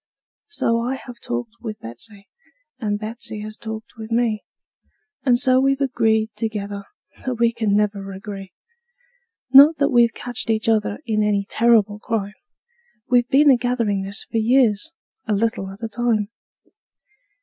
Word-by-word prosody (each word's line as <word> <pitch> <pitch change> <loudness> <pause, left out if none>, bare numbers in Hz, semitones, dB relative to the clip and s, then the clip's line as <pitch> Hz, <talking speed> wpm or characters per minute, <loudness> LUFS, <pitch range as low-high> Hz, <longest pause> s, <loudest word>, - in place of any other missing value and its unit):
So 230 - 0
I 245 +3 -1
have 245 -2 -11
talked 240 -1 -5
with 215 -3 -6
Betsey, 195 - -10 0.5
and 210 -3 -1
Betsey 215 0 -5
has 215 0 -7
talked 220 0 -8
with 220 0 -8
me, 230 -2 +1 0.8
And 250 -3 +3
so 255 0 +4
we've 275 0 +2
agreed 220 -5 +1
together 205 -3 -4 0.4
that 255 -1 -2
we 235 0 +2
can't 220 -3 0
never 200 -1 0
agree; 195 -1 -8 1.0
Not 290 +4 +9
that 280 - +2
we've 235 -2 +4
catched 245 -2 -5
each 220 0 0
other 215 -2 +1
in 215 -2 0
any 205 -1 +1
terrible 220 -3 +3
crime; 210 -3 -3 0.8
We've 245 -1 +3
been 285 +2 +6
a 255 - +5
gathering 235 -5 0
this 195 +2 -4
for - - -4
years, 235 +3 +2 0.4
a 215 - +1
little 205 -2 -1
at 195 +4 -10
a - - -1
time. 225 -2 0
225 Hz, 150 wpm, -21 LUFS, 210-240 Hz, 1.0 s, Not